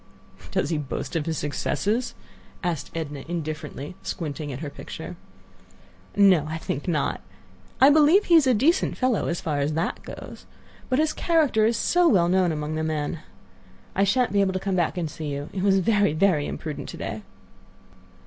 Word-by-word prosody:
"Does - - -1
he 160 - 0
boast 145 +3 -5
of 160 -1 -1
his 160 -2 -1
successes?" 200 - -1 0.5
asked 170 -5 -2
Edna, 150 -4 -4
indifferently, 155 -3 -5
squinting 150 -3 -4
at 130 - -6
her 150 - -4
picture. - - -8 1.0
"No, 190 -7 +5
I 160 - -3
think 145 -1 -4
not. 155 -5 0 0.6
I 270 +3 +8
believe 310 +7 +5
he 345 - +2
is 315 -5 +7
a 255 - +4
decent 300 - +2
fellow 255 -5 +1
as 170 - -2
far 150 -3 -1
as 145 +2 0
that 165 +3 -2
goes. - - -10 0.4
But 255 - +2
his 310 +1 +2
character 300 -10 +2
is 230 -1 +1
so 350 +9 +3
well 175 - +4
known 185 -1 +3
among 150 0 -3
the 155 0 -2
men. 155 0 -2 0.7
I 195 - +2
shan't 245 +2 +2
be 200 - +4
able 190 -1 +1
to 185 - -1
come 195 0 -1
back 175 0 0
and 170 -2 -1
see 155 0 -6
you; 145 +1 -4
it 190 - -3
was 195 0 +4
very, 205 -3 +2
very 155 -3 +2
imprudent 145 -4 -5
to - - -7
day." 110 - -5
175 Hz, 185 wpm, -25 LUFS, 150-215 Hz, 1.0 s, I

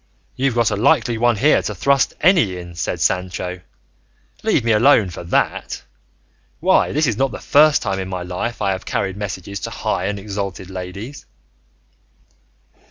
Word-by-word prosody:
"You've 135 -2 0
got 120 -2 +2
a - - 0
likely 120 0 +2
one 120 0 +3
here 145 +9 +3
to 105 - -4
thrust 135 +8 +2
any 150 - +4
in!" 85 -1 -9
said 85 - -3
Sancho; 90 0 -1 0.8
"leave - - +1
me 115 - +2
alone 110 -3 +4
for 85 - -8
that! - - -1 0.8
Why, - - +3
this 155 +2 +1
is 115 -6 0
not 135 +2 +2
the - - -7
first 150 +1 +4
time 95 -2 -2
in 95 0 -4
my 90 -1 -4
life 90 +7 -4
I 100 - +2
have 95 0 -3
carried 95 -1 -2
messages 100 -1 -5
to - - -5
high 90 - -2
and 105 0 -2
exalted 100 -2 -5
ladies." 95 +9 -7
100 Hz, 165 wpm, -20 LUFS, 95-120 Hz, 0.8 s, any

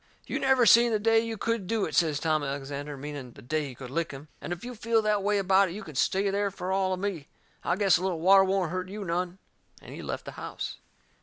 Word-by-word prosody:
"You - - -3
never 265 -2 +4
seen 235 +1 +7
the 215 - +3
day 225 +2 +4
you 225 0 -3
could 230 -3 -1
do 225 -1 0
it," - - -6
says 155 -4 +2
Tom 155 -1 +1
Alexander, 140 +1 -5
meaning 140 -3 -7
the - - -14
day 150 +3 -1
he 130 - -9
could 125 -1 -9
lick 165 +3 -1
him. 140 +2 -10
"And - - -6
if 175 +5 -5
you 250 - -6
feel 230 0 +1
that 210 -1 +2
way 205 +1 +1
about 195 0 +4
it 170 - -7
you 215 - -6
can 155 - -10
stay 195 +9 +1
there 200 0 0
fur 185 -1 -5
all 190 -1 +1
of 185 - -3
me. 185 -7 -3 0.4
I - - +1
guess 195 -2 +4
a - - -6
little 185 -3 -1
water 195 +3 +6
won't 190 -3 0
hurt 185 0 -3
you 205 0 -6
none." 175 +1 -2 0.4
And - - -11
he - - -7
left - - -5
the - - -6
house. - - -5
185 Hz, 260 wpm, -28 LUFS, 155-205 Hz, 0.4 s, seen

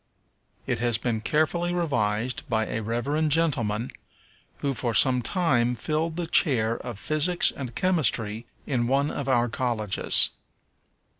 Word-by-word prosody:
It - - -2
has 120 -1 +1
been 115 -2 -2
carefully 170 +6 0
revised 125 -6 -1
by 110 -1 +1
a 110 - -3
Reverend 140 +8 -1
gentleman, 125 -8 0 0.7
who 140 -1 -2
for 120 -2 -3
some 125 +1 +4
time 125 -5 +1
filled 160 +5 -2
the 175 0 -3
chair 120 - +2
of 120 -4 -7
Physics 155 - +2
and 125 -4 -7
Chemistry 115 - 0 0.2
in 120 -4 -1
one 140 +3 +1
of 140 -1 -4
our 120 -2 +2
colleges. 110 -4 +2
125 Hz, 135 wpm, -25 LUFS, 115-155 Hz, 0.7 s, some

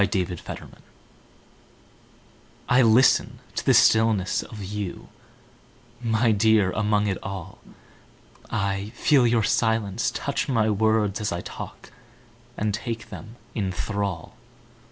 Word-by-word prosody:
Listening 95 -3 -2 2.0
I 125 +1 +5
LISTEN 120 +2 +4 0.2
to - - -2
the - - +4
stillness 110 -4 +4
of 105 -3 -9
you, 100 -1 -5 0.9
My 115 0 +2
dear, 105 -2 +3
among 105 0 +1
it 100 -2 -1
all;I 100 +2 -7
feel 135 -5 +4
your 115 -1 +2
silence 110 -2 +1
touch - - -3
my 110 -4 +2
words 110 0 +1
as 105 - -1
I 85 0 -3
talk, - - -9 0.7
And 105 -1 -1
take 115 +1 -5
them 110 +2 -9 0.2
in 100 -4 -2
thrall. 95 -1 -3
105 Hz, 110 wpm, -24 LUFS, 100-110 Hz, 2.0 s, I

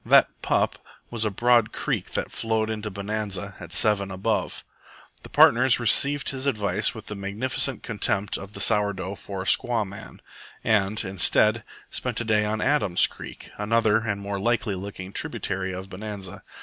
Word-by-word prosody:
"That - - +4
pup" - - 0 0.3
was 115 -2 0
a - - +1
broad 120 +2 +3
creek - - -3
that - - -3
flowed 110 -1 -1
into 105 -1 -4
Bonanza 100 -1 -4
at 85 -2 -10
7 100 +1 +2
ABOVE. 100 +3 -2 0.6
The - - -12
partners 125 +1 +5
received 140 +4 +3
his 135 0 -4
advice 105 -8 +1
with 110 - -9
the - - -6
magnificent 105 +5 0
contempt 105 -3 0
of 100 +1 -6
the - - -8
sour 100 +1 +2
dough 95 0 -5
for 95 -1 -7
a - - -11
squaw 115 0 +3
man, 100 +3 -11 0.4
and, 105 -1 +1
instead, 105 +3 +2 0.3
spent - - -2
the 120 - 0
day 105 -1 +2
on 105 0 -2
Adam's 130 -11 +4
Creek, - - -9
another 110 0 +2
and 110 -3 -2
more 100 0 -4
likely 110 0 0
looking 95 0 -7
tributary 95 -1 -3
of 95 +1 -6
Bonanza. 100 -1 -7
105 Hz, 165 wpm, -25 LUFS, 100-115 Hz, 0.6 s, partners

